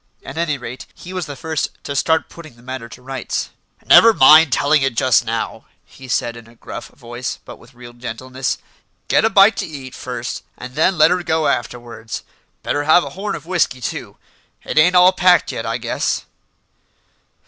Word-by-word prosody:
At 135 - -9
any 160 -3 -1
rate, 125 0 -9
he 180 - -10
was 185 -2 -4
the 145 - -7
first 160 +2 -3
to 140 - -5
start 160 +3 +1
putting 155 -6 -13
the 120 - -20
matter 130 -2 -7
to 125 - -13
rights. 135 -1 -4 0.3
"Never 230 -1 +7
mind 155 +2 +7
telling 145 +3 +3
it 135 -3 0
just 120 0 +3
now," 115 0 -4 0.2
he 130 - -14
said 120 -1 -1
in 115 -1 -12
a 115 - -19
gruff - - -9
voice, 120 -1 -7
but - - -10
with 125 - -19
real 120 0 -12
gentleness; 125 +2 -4 0.5
"get - - +3
a - - +4
bite 200 0 +5
t'eat 140 -7 -6
first - - -5 0.2
and 125 - -9
then 160 +6 +2
let 155 - +5
her 180 0 +1
go 160 -2 0
afterwards. 120 -2 -4 0.4
Better 145 0 -1
have 160 +3 +5
a - - -7
horn 200 +2 -4
of - - -9
whisky 170 -7 0
too. 120 - -6 0.5
It - - 0
ain't 180 +4 +4
all 180 +1 +7
packed 180 -1 +3
yet, - - -5
I - - -1
guess." - - -2
135 Hz, 190 wpm, -19 LUFS, 120-170 Hz, 0.5 s, Never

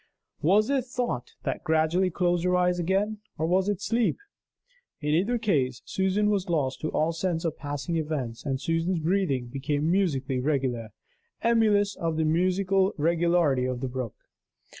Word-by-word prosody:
Was 210 - +3
it 270 -3 +1
thought 245 - -3
that - - -3
gradually 160 +4 +2
closed 175 0 0
her 180 0 +2
eyes 180 0 +2
again? 195 +5 0 0.2
or 160 - 0
was 185 +4 +2
it 205 -2 -2
sleep? 230 +2 +1 0.8
In 150 - -3
either 200 +10 +2
case, 140 - 0
Susan 195 +2 +1
was 195 -3 -1
lost 140 -6 0
to 155 - -1
all 155 +2 +1
sense 165 0 -2
of 160 - -1
passing 145 +3 -3
events; 145 -7 -3
and 135 -3 -2
Susan's 165 +4 0
breathing 165 -6 0
became 145 +5 -1
musically 135 -9 +1
regular, 130 -5 -1 0.5
emulous 210 -3 +3
of 165 -2 -2
the 160 - +1
musical 185 +4 +2
regularity 165 -4 +2
of 130 -1 -2
the 130 - -2
brook. 125 -3 -5
170 Hz, 160 wpm, -27 LUFS, 145-190 Hz, 0.8 s, Was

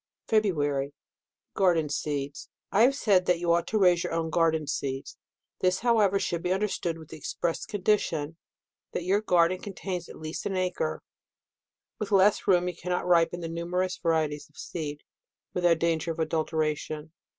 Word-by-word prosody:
FEBRUARY. 145 -10 +1 0.6
Garden 175 -5 +3
Seeds. 145 -1 -3
— - - -62
I 205 - +3
have 260 +4 +5
said 195 -9 +3
that 180 - +4
you 170 0 +2
ought 170 0 +1
to 220 - 0
raise 180 -4 +4
your - - -3
own 165 -1 -1
garden 160 -2 +2
seeds. 135 -1 -3 0.4
This, 185 0 +1
however, 220 -5 +3
should 170 -3 -1
be 180 - -1
understood 190 -4 -1
with 160 -2 -12
the 160 - -8
ex - - -6
press 170 -1 -2
condition, 175 -7 0 0.6
that - - -2
your 195 +4 +2
garden 180 -2 +3
contains 185 -3 -5
at - - -10
least 155 +1 -4
an 195 - -2
acre. 180 - -1 1.0
With 210 0 -4
less 200 +1 +4
room, 180 -2 +4
you 180 - -3
cannot 180 +1 -2
ripen 175 0 +3
the 165 - -3
numerous 180 +2 -2
varieties 155 -4 0
of 150 - -26
seed, 150 -3 -5 0.5
without 175 -2 +3
danger 165 0 0
of 160 - -6
adulteration. 155 -1 -1
170 Hz, 170 wpm, -28 LUFS, 160-185 Hz, 1.0 s, have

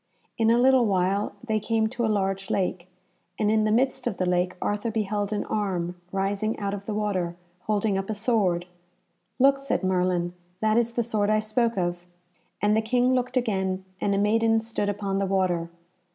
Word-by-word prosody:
In 225 -1 +2
a 230 - +5
little 255 -1 +5
while 195 +1 +1
they 220 -3 0
came 220 +1 +1
to 240 0 -3
a - - +2
large 195 -2 -1
lake, 180 -2 -1 0.5
and 210 -1 +2
in 215 -1 +3
the 215 - +2
midst 250 +3 +1
of 215 - -2
the 185 - 0
lake 180 0 +1
Arthur 205 +3 -1
beheld 210 -2 -1
an 210 - -1
arm 185 -5 -1 0.2
rising 200 +3 -1
out 200 -1 -2
of 200 0 -6
the 215 - -2
water, 190 -5 -1 0.3
holding 210 -2 +1
up 195 - -5
a 220 - -1
sword. 205 -6 +1 0.7
"Look!" 275 +1 +4
said 275 -7 -2
Merlin, 180 -1 +1 0.3
"that 215 0 +2
is 235 0 +2
the 235 - 0
sword 215 -3 0
I 215 - +4
spoke 230 +2 0
of." 175 -1 -1 0.6
And 210 +1 +4
the 220 - +3
King 245 +3 +2
looked 250 0 0
again, 190 -5 -1 0.2
and 200 - +1
a - - +1
maiden 225 +2 +3
stood 220 -2 -2
upon 200 -1 -2
the 195 - 0
water. 180 -3 0
210 Hz, 195 wpm, -26 LUFS, 190-225 Hz, 0.7 s, a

